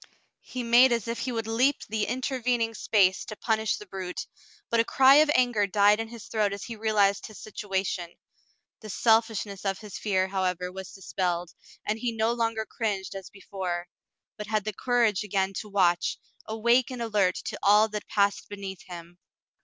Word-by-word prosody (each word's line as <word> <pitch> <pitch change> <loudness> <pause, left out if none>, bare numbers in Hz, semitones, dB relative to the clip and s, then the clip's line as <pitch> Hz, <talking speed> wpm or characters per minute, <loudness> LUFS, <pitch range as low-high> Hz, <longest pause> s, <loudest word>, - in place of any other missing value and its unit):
He 250 -1 -6
made 240 +2 +6
as 235 -2 0
if 230 0 -3
he 255 - -2
would 225 -2 -2
leap 250 +5 +1
the 215 0 -1
intervening 250 -3 -1
space 195 -4 +2
to 215 - -7
punish 220 -1 0
the 210 - -10
brute, 185 -2 -5 0.5
but 230 - +3
a - - +5
cry 270 +3 +6
of 305 0 +5
anger 240 -5 +3
died 205 +2 +4
in 225 - -3
his 230 -1 -10
throat 210 -3 0
as 200 - -6
he 230 - -6
realized 210 -2 +1
his 215 - -12
situation. 195 -4 -3 0.7
The 215 - -10
selfishness 220 -2 +1
of 195 -1 -1
his 210 -1 -9
fear, 190 -3 +1
however, 180 -2 -1
was 190 0 -8
dispelled, 180 -2 -3 0.3
and 215 +1 -1
he 240 +1 -1
no 225 +1 +1
longer 225 -2 -1
cringed 205 -6 -3
as 195 -2 -8
be 195 - -16
fore, 180 -3 -4 0.5
but 210 - -6
had 215 -1 0
the 215 +1 -3
courage 230 -3 +1
again 195 -1 -1
to 210 - -8
watch, 180 -4 +2 0.3
awake 235 +3 +2
and 250 -2 -4
alert 205 -5 +1
to - - -5
all 210 +2 +5
that 210 -1 -5
passed 200 -1 +1
beneath 195 -2 -7
him. 175 0 -10
210 Hz, 185 wpm, -27 LUFS, 195-230 Hz, 0.7 s, made